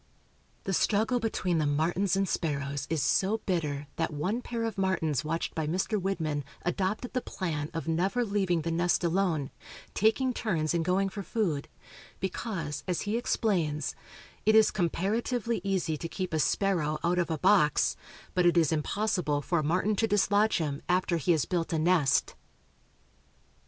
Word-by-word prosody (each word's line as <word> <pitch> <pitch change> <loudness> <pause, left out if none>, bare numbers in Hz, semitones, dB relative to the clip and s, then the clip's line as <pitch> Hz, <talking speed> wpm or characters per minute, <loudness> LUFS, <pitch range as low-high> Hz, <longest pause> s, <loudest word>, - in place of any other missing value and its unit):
The 195 - -2
struggle 220 +6 +2
between 185 -7 0
the 150 - +1
martins 170 +7 +1
and 195 0 +1
sparrows 140 -5 -2
is 160 -3 0
so 200 +3 +2
bitter 150 -6 -1
that - - 0
one 185 +11 -2
pair 235 -2 -4
of 225 -1 -2
martins 185 -7 0
watched 165 +2 -2
by 160 -2 -2
Mr. 190 +5 0
Widmann 160 -6 -1 0.2
adopted 190 +7 -1
the 255 - 0
plan 155 -9 -3
of 165 0 -5
never 190 +9 +1
leaving 190 -6 0
the 165 - -2
nest 175 +2 +1
alone, 170 -5 0 0.4
taking 250 +5 +2
turns 170 -10 -1
in 170 - +1
going 185 +3 +1
for 200 +1 -6
food, 180 -9 -1 0.5
because, 170 -6 -3
as 180 -2 -1
he 210 +2 -2
explains, 175 -10 0 0.5
"it 220 - +4
is 220 -1 +6
comparatively 220 +5 -1
easy 185 -5 0
to 165 - -5
keep 185 -2 -4
a 155 - +1
sparrow 160 -4 +1
out 175 +1 +2
of 175 - 0
a 160 - -1
box, 180 -2 +3 0.4
but 180 -1 +3
it 175 - +3
is 160 -4 +4
impossible 160 -1 0
for 170 +2 +1
a - - -1
martin 185 +7 +1
to 225 - +2
dislodge 205 +1 +3
him 145 -4 -2
after 180 -1 +2
he 165 +3 +1
has 160 -4 +2
built 170 -3 -1
a 165 - +1
nest." 160 -3 +2
180 Hz, 165 wpm, -29 LUFS, 160-200 Hz, 0.5 s, is